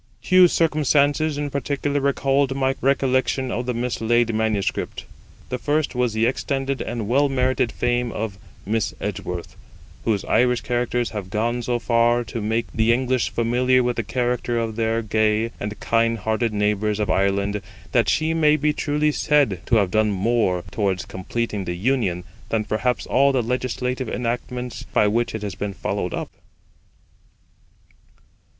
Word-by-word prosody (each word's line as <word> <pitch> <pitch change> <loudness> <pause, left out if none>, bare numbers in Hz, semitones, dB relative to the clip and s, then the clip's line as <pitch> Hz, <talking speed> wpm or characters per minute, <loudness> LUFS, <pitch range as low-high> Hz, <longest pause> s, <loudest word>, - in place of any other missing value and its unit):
Two 185 -1 +6
circumstances 150 -2 +2
in 145 -1 -3
particular 140 +1 -1
recalled 135 0 +1
my 135 0 +1
recollection 130 -1 +1
of 120 +1 -3
the 125 - 0
mislaid 120 -1 +1
manuscript. 110 -2 -1 0.4
The 125 - -3
first 150 +2 0
was 125 -3 0
the 110 +1 +2
extended 135 +2 -1
and 115 -4 -4
well 140 +5 +3
merited 130 -3 +1
fame 120 0 0
of 105 -3 -4 0.3
Miss 110 +1 -1
Edgeworth, 90 -3 -5 0.5
whose 105 -4 0
Irish 125 0 +2
characters 120 0 -1
have 100 -4 -5
gone 120 +4 -1
so 120 0 0
far 120 +1 +2
to 115 0 -5
make 110 +2 0
the 110 +1 +3
English 130 0 +1
familiar 125 +2 +2
with 120 0 0
the - - 0
character 120 +1 -1
of 115 -1 -2
their 115 0 0
gay 110 +1 +1
and 105 0 -5
kind 115 0 +1
hearted 110 +2 -1
neighbours 105 0 0
of 105 -3 0
Ireland, 100 +2 +1 0.3
that 120 -2 +3
she 160 0 +1
may 155 -2 +4
be 150 0 +1
truly 150 +1 0
said 140 - +2
to 120 - +3
have 100 -5 +2
done 110 +1 +2
more 100 -3 +1
towards 95 -4 -1
completing 105 +1 -3
the 90 0 -3
Union 95 -5 0 0.3
than 110 -1 0
perhaps 110 +4 -1
all 140 +2 +3
the 130 -3 +1
legislative 125 +1 -2
enactments 125 +1 -3
by - - +1
which 115 +2 0
it 110 - -5
has 100 -2 -3
been 100 +2 -4
followed - - -2
up. - - -5
120 Hz, 155 wpm, -22 LUFS, 110-130 Hz, 0.5 s, Two